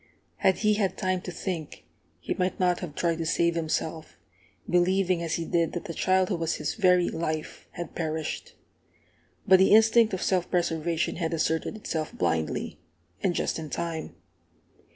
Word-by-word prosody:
Had 190 - +3
he 210 - +5
had 205 -3 0
time 185 -2 0
to 180 - -6
think, 170 -4 -5 0.3
he - - -3
might 185 0 -1
not 180 -1 +2
have 165 -6 -7
tried 170 -1 0
to 165 - -2
save 170 +1 +2
himself, 160 -1 -3 0.5
believing 180 0 +2
as 165 -1 -1
he 165 - -3
did 170 -2 0
that 175 - -4
the 165 - -5
child 185 +3 +2
who 185 - 0
was 165 0 -1
his - - -2
very 180 -4 +4
life 155 -1 -4
had 175 -2 -6
perished. 160 -2 -4 0.9
But 190 -1 +7
the 190 +2 +6
instinct 225 0 +5
of 185 - -4
self 185 -2 +1
preservation 170 -2 0
had 165 -2 -1
asserted 160 +6 -1
itself 160 -7 -4
blindly, 80 -3 -1 0.4
and 175 - +1
just - - -1
in 155 -2 -6
time. 165 -1 -4
170 Hz, 170 wpm, -27 LUFS, 160-185 Hz, 0.9 s, But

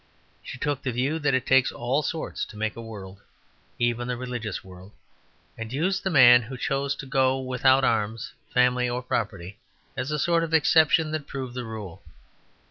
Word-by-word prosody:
She - - -8
took 145 0 -2
the 130 - -2
view 135 +7 -1
that 145 -3 +1
it 130 0 -1
takes 130 -1 +4
all 125 +5 -1
sorts 160 +1 -4
to 110 - -13
make 110 +1 -2
a 115 - -7
world, 100 -4 -10 0.6
even 120 0 0
the 125 -1 -2
religious 120 -5 -5
world; 95 +1 -14 0.6
and 115 0 -7
used 185 +8 -1
the 190 - 0
man 125 -6 +7
who 130 +3 -8
chose 135 +2 -1
to 135 - -8
go 135 -1 +1
without 130 +1 +2
arms, 110 -1 -1 0.2
family, 125 0 +2
or 125 +1 -3
property 100 -6 -4 0.4
as 130 - -3
a 150 - -1
sort 170 +2 +2
of 165 -1 0
exception 155 +2 +4
that 155 -2 -4
proved 130 -3 -6
the 125 -1 -5
rule. 105 -6 -8
125 Hz, 185 wpm, -25 LUFS, 115-140 Hz, 0.6 s, man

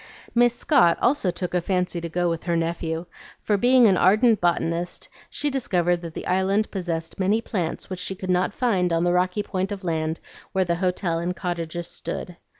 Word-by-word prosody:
Miss 240 0 +4
Scott 245 - +4
also 245 -6 +2
took 180 0 -3
a 180 - +2
fancy 180 -1 -1
to 170 - -4
go 175 +2 0
with 165 0 -2
her 170 -2 +1
nephew; 165 0 -2 0.3
for, 210 - 0
being 245 +4 +5
an 195 -4 +5
ardent 215 +5 +4
botanist, 175 0 -1 0.2
she 295 - -1
discovered 175 -9 +1
that 165 -2 -8
the - - -5
Island 190 +3 +1
possessed 170 -4 -4
many 200 +4 +2
plants 185 -8 -3
which 185 -2 -6
she 190 +1 -4
could 185 0 -3
not 180 +2 +2
find 195 -7 +1
on 165 0 +2
the 175 0 +2
rocky 180 +3 +1
point 190 0 -2
of 200 -1 -5
land 160 -2 -1 0.3
where 190 -1 +2
the 170 -1 0
hotel 180 -2 0
and 175 +2 -2
cottages 170 -1 -4
stood. 180 - -6
180 Hz, 195 wpm, -24 LUFS, 170-200 Hz, 0.3 s, being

